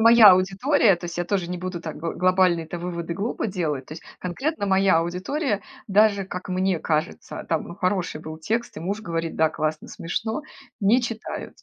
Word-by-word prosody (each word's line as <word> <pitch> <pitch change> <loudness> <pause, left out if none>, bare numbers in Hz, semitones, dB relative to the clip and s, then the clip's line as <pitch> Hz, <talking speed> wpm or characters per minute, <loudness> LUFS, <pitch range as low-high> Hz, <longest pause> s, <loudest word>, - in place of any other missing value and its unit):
моя 225 -3 +9
аудитория, 195 +4 +3
то 175 - -10
есть 170 0 -5
я 175 - 0
тоже 185 -2 -1
не 180 - -3
буду 180 -1 -4
так 160 -2 -6
гл 165 +1 -3
глобальные-то 180 -2 +2
выводы 170 -1 -4
глупо 215 +4 -2
делать, 155 -9 -2
то - - -9
есть 165 - -10 0.2
конкретно 255 - -2
моя 190 -3 +4
аудитория 200 - -1 0.2
даже, 200 -1 +4
как 185 -1 -7
мне 185 -1 +1
кажется, 155 0 -2
там, 165 -2 0
ну, 170 - -7
хороший 185 -4 -1
был 155 0 -8
текст, 225 +8 -2
и - - -5
муж 200 +5 -2
говорит: 165 -4 -3
"Да, 160 0 +4
классно, 155 0 -3
смешно", 220 - -3 0.4
не 215 +6 +4
читают. 230 -2 -5
185 Hz, 185 wpm, -24 LUFS, 170-205 Hz, 0.4 s, моя